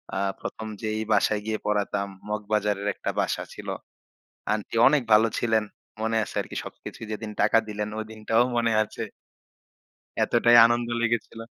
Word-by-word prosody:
আ - - -1 0.2
১ম 110 0 -6
যেই 110 0 -2
বাসায় 105 -1 +3
গিয়ে 110 -1 -2
পড়াতাম, 100 -1 0 0.2
মগবাজারের 105 -1 -1
একটা - - -3
বাসা - - 0
ছিল। - - -10 0.9
আন্টি 105 +1 -3
অনেক 145 0 +2
ভালো 110 +1 +5
ছিলেন, 110 -2 +2 0.4
মনে 110 +1 0
আছে - - -11
আরকি - - -10
সবকিছুই। 115 - -9
যেদিন 110 0 -5
টাকা 110 +2 +5
দিলেন 105 0 -3
ঐদিনটাও 110 +1 0
মনে 115 -1 +2
আছে। 110 - -6 1.2
এতটাই 120 0 +4
আনন্দ 120 0 +1
লেগেছিল। 120 -1 -1
110 Hz, 140 wpm, -26 LUFS, 105-115 Hz, 1.2 s, ভালো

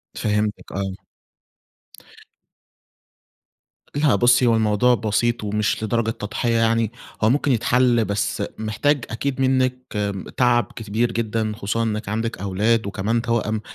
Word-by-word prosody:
فهمتِك 105 0 -1
آه. 95 0 -3 3.0
لأ 145 -5 +3
بُصّي 120 +4 +4
هو 115 - +4
الموضوع 110 +3 +3
بسيط 115 +1 0
ومش 105 +1 -1
لدرجة 110 +1 0
تضحية 115 +2 -2
يعني، 115 -1 +2 0.3
هو 110 - +5
ممكن 140 +2 +2
يتحل 120 -1 +3
بس 100 0 -1
محتاج 120 +6 0
أكيد 135 +3 -2
منِّك 130 -1 +2 0.6
تعب 120 -1 +3
كبير 115 +2 -1
جدًا 110 -1 -1
خصوصًا 110 +2 -1
إنِّك 110 -2 -2
عندِك 115 +2 -2
أولاد، 100 +3 +1
وكمان 105 +4 -1
توأم، 115 -2 -1
115 Hz, 120 wpm, -22 LUFS, 105-120 Hz, 3.0 s, هو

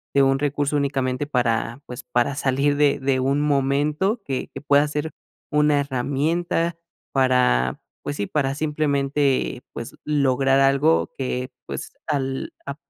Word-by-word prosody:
de 140 - +6
un 135 0 +4
recurso 145 0 0
únicamente 135 -1 -1
para, 120 -2 0
pues, 125 - -7
para 125 +3 0
salir 140 +1 +1
de 145 -1 +3
de 135 -1 +1
un 135 +3 +1
momento 150 - +1
que 135 -6 -4
que - - -7
pueda 145 +1 +4
ser 150 +1 -3 0.4
una 150 -1 +3
herramienta 150 +5 -1 0.3
para, 125 - +2 0.2
pues 145 - -4
sí, 100 - -2
para 135 -3 0
simplemente 145 -3 0
pues 115 - -7
lograr 135 -2 +2
algo 140 +4 +3
que 125 -1 -3
pues 70 -1 -6
al 135 -2 -2
a 140 - -4
140 Hz, 140 wpm, -23 LUFS, 130-145 Hz, 0.4 s, de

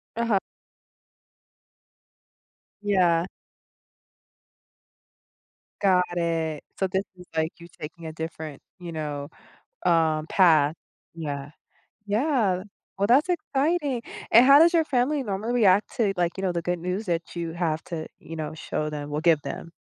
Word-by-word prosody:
Uh-huh. 230 -4 +2 2.4
Yeah. 180 -5 +3 2.6
Got 180 -2 +2
it, 165 -3 -1
so 190 - +1
this 190 +1 -1
is, 180 - -12
like, 160 +1 +1
you 170 - -11
taking 165 +2 -8
a 160 - -4
different, 160 -2 -6 0.2
you 175 -1 -7
know, 150 -2 -4 0.6
uh, 160 -2 +3
path. 160 -5 +4 0.4
Yeah. 145 -3 -5 0.5
Yeah. 210 -4 +1 0.3
Well, 200 - +2
that's 270 +8 +5
exciting, 295 -4 0 0.3
and 235 +3 +8
how 275 +1 +9
does 340 +2 +6
your 330 - +4
family 275 +2 +1
normally 215 +1 -2
react 205 -4 +3
to, 210 -5 +2
like, 175 -1 +2
you - - -3
know, 185 - +1
the 170 - -1
good 175 -1 -1
news 180 +5 -3
that 170 0 -2
you 170 -1 -3
have 165 -2 -1
to, 160 -3 -5
you 165 - -9
know, 155 -1 -4
show 155 -1 -3
them 145 -1 -6
or 150 - -1
give 165 -3 +4
them? 140 +4 -6
175 Hz, 140 wpm, -26 LUFS, 160-215 Hz, 2.6 s, how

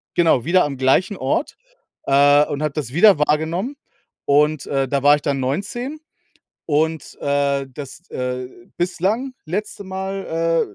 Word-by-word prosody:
genau, 165 -8 +3
wieder 180 +3 +4
am 140 -2 -4
gleichen 135 +10 +2
Ort, 135 - -1 0.5
äh, 145 +1 +5
und 145 - -4
habe 150 -2 -1
das 140 -5 -4
wieder 195 +2 +6
wahrgenommen. 160 - 0 0.5
Und, 150 0 +2
äh, 135 -1 0
da 140 +1 0
war 145 +1 +7
ich 145 - -5
dann 140 -2 0
19 240 - -3 0.7
und, 160 +1 -1
äh, 140 -1 0
das, 140 +3 -9
äh, 125 0 -3 0.3
bislang 200 +9 -1
letzte 200 +4 -4
Mal, 190 -4 -1
150 Hz, 140 wpm, -20 LUFS, 140-185 Hz, 0.7 s, war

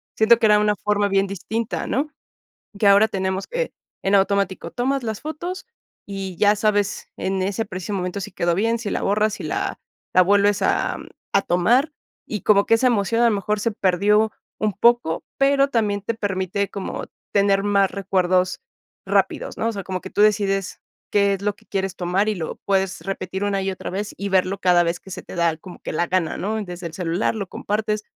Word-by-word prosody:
Siento 220 +1 +5
que 230 - +3
era 210 -1 +6
una 210 0 +2
forma 205 +1 +1
bien 195 0 +2
distinta, 220 +4 -3
¿no? 280 +5 0 0.7
Que 205 - +2
ahora 200 +2 +6
tenemos 190 -1 -2
que, - - -3 0.3
en 195 - +1
automático, 195 -3 +1
tomas 265 +5 -1
las 220 -3 -4
fotos 345 +5 -5 0.4
y 195 -2 -5
ya 205 +3 +4
sabes 205 -1 0
en 190 0 -2
ese 200 +3 -1
preciso 190 0 -5
momento 180 +1 -3
si 185 - -6
quedó 170 -1 +1
bien, 225 +5 +1
si 220 -3 -4
la - - -2
borras, 210 +1 +1
si - - -8
la - - -2 0.4
la 185 - +7
vuelves 200 +1 +3
a - - +1 0.4
a 200 - +4
tomar. 240 - +2 0.3
Y 210 - -4
como 200 -1 +4
que 225 - +5
esa 230 +3 +2
emoción 230 0 +2
a 235 - +6
lo 225 - +2
mejor 210 +1 -1
se 225 +2 -1
perdió 210 +3 +2 0.3
un 215 -1 0
poco, 220 -4 +2
pero 275 0 +4
también 215 -6 0
te 230 +3 -2
permite 200 -2 -2
como 200 -1 -5 0.3
tener 200 -1 +3
más 200 -1 +3
recuerdos 185 -2 +1 0.4
rápidos, - - 0
¿no? - - -1
O - - -1
sea, 200 -2 -5
como 185 0 -4
que 190 - -8
tú 205 - +2
decides 200 -2 +1 0.3
qué 200 -1 +3
es 195 - -6
lo 205 0 0
que - - -25
quieres 195 -1 -2
tomar 185 +4 0
y 215 - +1
lo 160 -3 -4
puedes 195 -1 0
repetir 190 0 -4
una 200 -1 0
y 195 - -1
otra 185 - -6
vez, 200 +3 -4
y 200 - -3
verlo 190 0 +1
cada 180 -2 +4
vez 170 +1 -2
que 190 - -14
se - - -6
te - - -10
da 170 -2 +1
como 180 +2 -12
que - - -5
la 175 +2 0
gana, 180 -2 0
¿no? 215 +2 -2
Desde 175 -1 -7
el 165 - -7
celular, 175 +4 -1
lo 200 -4 -4
compartes, 210 +2 -2
200 Hz, 205 wpm, -22 LUFS, 190-215 Hz, 0.7 s, la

